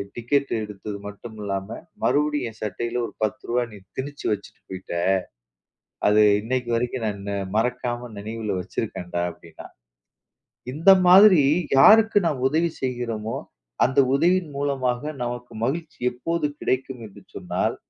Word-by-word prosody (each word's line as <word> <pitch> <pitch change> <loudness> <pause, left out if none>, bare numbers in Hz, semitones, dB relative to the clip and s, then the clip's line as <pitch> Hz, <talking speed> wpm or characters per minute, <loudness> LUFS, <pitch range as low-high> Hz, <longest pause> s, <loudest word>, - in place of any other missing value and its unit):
Ticket 135 +4 0
எடுத்தது 105 0 -7
மட்டும் 110 +2 -10
இல்லாம, 100 -1 -3 0.4
மறுபடியும் 150 -2 +1
என் 110 - -20
சட்டையில 120 +4 -2
ஒரு - - -13
10 110 +5 -2
ரூவா 120 +1 +1
நீ - - -10 0.2
திணிச்சு 145 +2 -6
வச்சுட்டு 100 -1 -9
போய்ட்ட, 95 -2 -6 1.1
அது 105 +1 +5 0.2
இன்னைக்கு 125 +1 -2
வரைக்கும் 120 0 -2
நான் 100 -1 -5 0.3
மறக்காம 120 +1 -1
நினைவுல 105 -1 -4
வச்சுருக்கன்டா" 90 -3 -4
அப்படின்னான். 85 -1 -14 1.0
இந்த 165 +7 +6 0.2
மாதிரி 185 -2 +8 0.4
யாருக்கு 220 +9 +7
நாம் 140 -6 -2
உதவி 165 +4 +1
செய்கிறோமோ, 120 -4 -3 0.5
அந்த 130 +2 +1 0.2
உதவியின் 175 +2 +2
மூலமாக 135 -3 -1 0.2
நமக்கு 120 0 -5
மகிழ்ச்சி 155 +4 -3
எப்போது 160 +6 -2 0.2
கிடைக்கும் 130 -1 -2
என்று 100 - -15
சொன்னால், - - -2
125 Hz, 125 wpm, -24 LUFS, 105-145 Hz, 1.1 s, மாதிரி